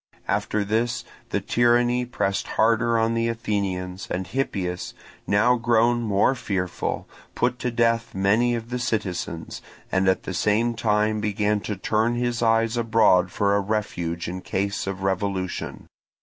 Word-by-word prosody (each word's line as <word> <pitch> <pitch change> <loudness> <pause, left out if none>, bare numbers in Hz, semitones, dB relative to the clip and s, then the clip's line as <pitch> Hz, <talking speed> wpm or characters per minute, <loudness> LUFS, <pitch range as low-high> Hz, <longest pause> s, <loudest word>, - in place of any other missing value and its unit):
After 105 -1 0
this 115 +4 0 0.3
the - - 0
tyranny 120 +1 +2
pressed 100 -5 -1
harder 115 +1 +3
on 115 0 +2
the 115 0 +1
Athenians, 95 -5 -2
and 95 +1 -2
Hippias, 90 -5 -3 0.3
now 110 +5 +4
grown 120 0 +3
more 105 +2 +2
fearful, 95 -7 -3 0.3
put 125 0 0
to 125 - -1
death 115 -1 +1
many 110 +6 +2
of 115 +1 -6
the 125 - -2
citizens, 95 -8 -3 0.3
and 95 0 +2
at 95 - +2
the 95 - -5
same 105 +6 +1
time 105 -1 +1
began 105 0 +1
to 105 +1 -4
turn 110 +4 0
his 120 -1 -1
eyes 115 0 +2
abroad 110 -6 +3
for 100 0 +1
a - - +3
refuge 90 -5 -2
in 90 +2 -5
case 100 +2 -2
of 95 -1 -4
revolution. 95 -1 -2
110 Hz, 150 wpm, -24 LUFS, 95-115 Hz, 0.3 s, now